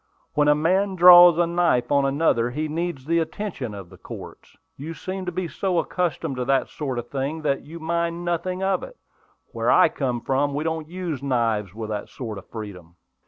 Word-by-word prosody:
"When 150 0 +2
a 150 - +5
man 190 +6 +1
draws 175 -1 +9
a 175 - +3
knife 170 -8 +1
on 140 -1 +3
another, 135 -4 +1
he 150 +5 -3
needs 160 -3 -4
the 170 +2 +2
attention 160 - -4
of 95 -3 -10
the - - -15
courts. - - -11 0.2
You 160 +4 -7
seem 185 +1 -6
to - - -1
be 180 0 -3
so 185 +2 -2
accustomed 165 -5 -1
to 125 - -2
that 135 +1 +1
sort 135 -5 -4
of 120 0 -5
thing 140 +4 -3
that 140 -2 0
you 165 +3 -10
mind 170 +1 -2
nothing 180 +2 -2
about 190 -1 +1
it. - - -20 0.5
Where - - -1
I - - +6
come 125 -4 -2
from 140 +4 0
we 150 - -1
don't 160 -1 -3
use 175 -6 -4
knives 115 -7 -1
with 110 -1 -5
that 105 -1 -4
sort 110 -6 -6
of - - -18
freedom." 95 -6 -9
150 Hz, 205 wpm, -23 LUFS, 125-175 Hz, 0.5 s, draws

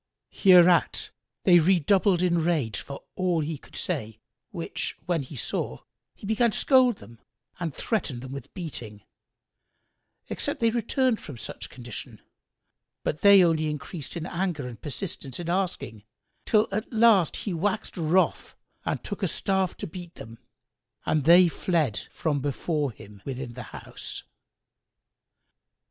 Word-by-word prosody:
Hereat 180 -2 +5 0.3
they 175 -2 +7
redoubled 185 +2 +3
in 170 -2 +2
rage 150 -11 0
for 140 - -8
all 180 -3 +1
he 155 -1 -3
could - - -17
say, 110 - -3 0.3
which - - -3
when 175 -3 0
he 140 +2 -9
saw, 65 - -3 0.3
he - - -11
began 220 +3 +3
to - - -2
scold 255 -4 +5
them 115 -1 -14 0.4
and 165 -5 -3
threaten 165 - -1
them 130 +1 -8
with 140 -2 -8
beating, 120 - -6 1.2
except - - -2
they 230 -1 +3
returned 240 +1 +1
from 140 - -8
such 105 - -6
condition; 120 -3 -8 0.8
but 150 - -2
they 200 -2 +8
only 160 -2 +2
increased 150 +1 -6
in 165 - -4
anger 170 -7 -2
and 115 -4 -9
persistence 145 -3 -4
in 170 -1 -4
asking, 175 - -2 0.4
till 215 0 +4
at 215 +3 -3
last 220 -7 +5
he 200 - -4
waxed 205 +5 -1
wroth 175 +1 +1 0.3
and - - -2
took - - -5
a - - +2
staff 190 -2 0
to - - -5
beat 175 +1 -9
them, 115 +1 -11 0.7
and 150 -3 +1
they 175 +2 +8
fled 160 - 0
from 150 -3 -1
before 145 +2 -1
him 105 -2 -14
within 130 -2 -5
the 125 - -7
house. - - -8
170 Hz, 145 wpm, -26 LUFS, 135-190 Hz, 1.2 s, they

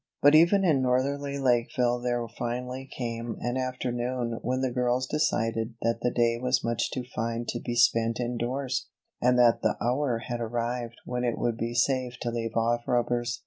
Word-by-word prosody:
But 145 +1 +7
even 175 +5 +6
in 150 -6 +3
northerly 140 +3 0
Lakeville 125 -1 +1
there 120 -1 -1
finally 125 +3 -5
came 115 -2 -4
an 120 +1 -2
afternoon 125 -2 -2
when 130 +2 -1
the 130 -1 0
girls 125 +1 +1
decided 115 -5 0
that 115 0 +1
the 125 - +2
day 120 -1 +1
was 125 +1 +1
much 115 0 0
too 130 - -4
fine 115 -1 -3
to 120 - -2
be 120 - -4
spent 115 -1 +3
indoors; 125 +2 -2 0.3
and 125 +1 +4
that 120 -1 +5
the 110 - +1
hour 125 +2 +1
had 120 0 -3
arrived 120 +1 -3
when 125 0 -2
it 120 -2 0
would 120 -1 0
be 115 +1 -3
safe 125 0 +1
to 120 - -1
leave 115 -1 -3
off 120 +1 +1
rubbers. 120 0 0
120 Hz, 180 wpm, -27 LUFS, 115-130 Hz, 0.3 s, But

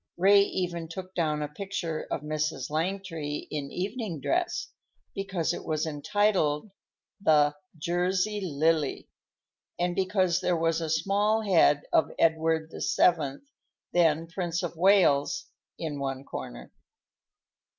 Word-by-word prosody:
Ray 200 +3 +6
even 175 -4 -2
took 185 +3 -8
down 150 -4 0
a - - -2
picture 170 -1 -4
of - - -2
Mrs. 150 -3 -2
Langtry 165 -3 -3
in 145 -2 -4
evening 195 - -3
dress, 350 - -1 0.4
because 190 -4 -1
it - - -6
was 155 0 -1
entitled 160 +2 0 0.5
the 150 -4 +4 0.2
"Jersey 180 +5 0
Lily," 155 -2 0 0.7
and 175 0 0
because 185 -2 +1
there 180 -1 +1
was 165 0 +1
a 160 - -3
small 200 +7 +2
head 165 -7 +4
of - - +4
Edward 160 0 +2
VII, 150 -6 +2 0.5
then 165 -2 +3
Prince 175 0 -3
of 175 -1 -4
Wales, 185 - +3 0.3
in 150 -3 -4
one 135 -1 -3
corner. - - -8
165 Hz, 120 wpm, -28 LUFS, 155-190 Hz, 0.7 s, Ray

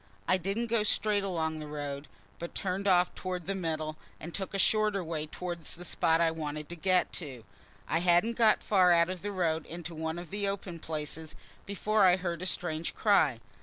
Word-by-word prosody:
I 185 - +4
didn't 195 +6 -1
go 230 -1 +1
straight 210 -1 +1
along 160 -4 -1
the 155 - -6
road, 145 -1 -5 0.3
but 170 - -6
turned 195 +1 -2
off 180 -2 +4
towards 180 -2 -4
the 195 - -1
middle, 155 -4 -2 0.2
and 170 +2 -8
took 195 0 -4
a - - +1
shorter 210 -1 +2
way 160 -2 -3
towards 170 0 -4
the 175 +1 -8
spot 160 0 +2
I 165 -1 +3
wanted 150 -2 -5
to 175 - -6
get 185 +2 +2
to. 130 -7 -8 0.4
I 165 - +1
hadn't 175 +6 +4
got 225 -2 +4
far 185 -3 +5
out 170 +1 +4
of 185 -2 -6
the 205 - -3
road 165 -5 0
into 170 0 -6
one 160 +1 -3
of 175 -2 -8
the 205 0 -1
open 190 -3 -4
places 155 0 -4 0.3
before 210 +2 +1
I 180 -1 +7
heard 175 -2 -3
a 185 - -2
strange 165 -3 -3
cry. 155 - +3
175 Hz, 205 wpm, -30 LUFS, 160-195 Hz, 0.4 s, I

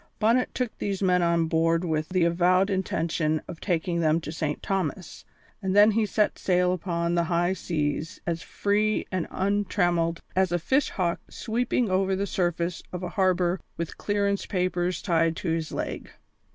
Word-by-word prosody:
Bonnet 230 +4 +2
took 250 -3 -2
these 200 -1 -2
men 180 -1 +3
on 170 -1 +2
board 165 +1 +1
with 155 -2 -1
the 185 -1 +2
avowed 180 +3 +3
intention 165 -4 0
of 165 - -8
taking 175 -1 0
them 160 0 +3
to 155 - -6
St. 155 -2 -3
Thomas, 185 -3 -3 0.4
and 190 -1 -1
then 205 +1 +7
he 215 0 +1
set 210 +2 +1
sail 180 -1 +2
upon 170 -1 -1
the 170 -1 +2
high 175 +2 +1
seas 155 -3 -2
as 170 -1 -2
free 210 +1 0
and 185 -3 -1
untrammelled 175 -4 0 0.2
as 190 -1 +2
a 175 - +2
fish 265 - +1
hawk 175 -2 -1
sweeping 235 -1 -1
over 190 +1 +2
the 200 +1 -1
surface 175 -2 -1
of 180 0 -5
a 180 - -3
harbour 185 -2 +1 0.2
with 170 -1 -5
clearance 200 -1 0
papers 180 -2 -1
tied 165 -2 +2
to 175 - -3
his 160 -1 -1
leg. - - -4
180 Hz, 170 wpm, -26 LUFS, 170-195 Hz, 0.4 s, then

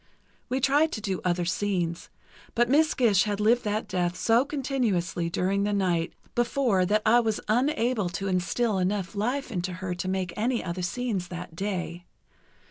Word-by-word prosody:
We 255 +1 0
tried 285 +4 +3
to - - -3
do 195 -3 -3
other 175 -1 0
scenes, 175 -3 -1 0.5
but 240 +1 +2
Miss 310 +3 +4
Gish 215 -6 +4
had 205 -1 -2
lived 230 +3 +3
that 210 +1 -1
death 180 -2 -1
so 230 +5 +3
continuously 230 - -1
during 190 +4 0
the 205 +1 0
night 180 -4 0 0.2
before 235 -6 +2
that 210 +2 +2
I 235 +2 +6
was 220 -3 0
unable 240 -4 +1
to 195 +3 -4
instill 190 +4 0
enough 190 +1 -1
life 245 +6 -2
into 180 -2 -2
her 185 0 -4
to 175 +1 -4
make 185 -2 -2
any 235 +3 0
other 180 0 -4
scenes 195 0 -2
that 175 -2 -8
day. 175 -2 -4
200 Hz, 170 wpm, -27 LUFS, 180-240 Hz, 0.5 s, I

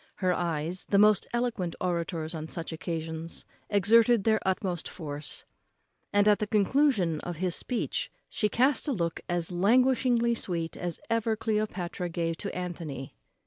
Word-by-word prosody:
Her 185 -2 +1
eyes, 170 +1 -1
the 200 - +2
most 210 -1 +5
eloquent 235 -8 -1
orators 170 -2 -1
on 160 -1 -5
such 165 +1 -4
occasions, 165 -1 -4 0.2
exerted 225 +3 +5
their 220 0 +3
utmost 185 -3 -1
force; 145 -3 -6 0.7
and 205 0 +4
at 210 -1 +5
the 210 - -1
conclusion 210 - +2
of 175 +2 -5
his 180 +2 -1
speech 265 - -2 0.2
she 210 - 0
cast 260 +7 +2
a 285 - +1
look 170 -6 -1
as 175 0 0
languishingly 235 +4 +3
sweet 170 -7 -3
as 175 -1 -4
ever 230 -1 +1
Cleopatra 210 -5 -2
gave 165 -1 -2
to 200 - -5
Antony. 165 -7 -5
185 Hz, 145 wpm, -29 LUFS, 170-220 Hz, 0.7 s, most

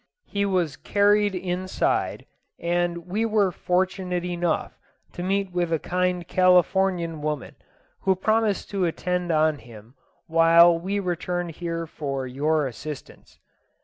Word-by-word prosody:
He 200 0 -1
was 180 -6 0
carried 205 0 +2
inside, 185 +1 -1 0.3
and 170 0 -1
we 200 +5 -1
were 210 -4 +2
fortunate 180 0 -1
enough 175 -2 -2 0.3
to - - -6
meet 195 +1 -1
with 175 -1 -1
a 165 - +3
kind 180 +1 -1
Californian 180 -2 +2
woman, 150 -3 -3 0.5
who 190 -1 +2
promised 215 +1 0
to 195 -3 0
attend 180 +1 -1
on 155 -2 +2
him 115 0 -14 0.3
while 165 +1 +6
we 190 +5 -2
returned 175 -1 -2
here 165 0 -4
for 140 -4 -4
your 150 +4 0
assistance." 140 +3 -8
175 Hz, 125 wpm, -24 LUFS, 165-185 Hz, 0.5 s, while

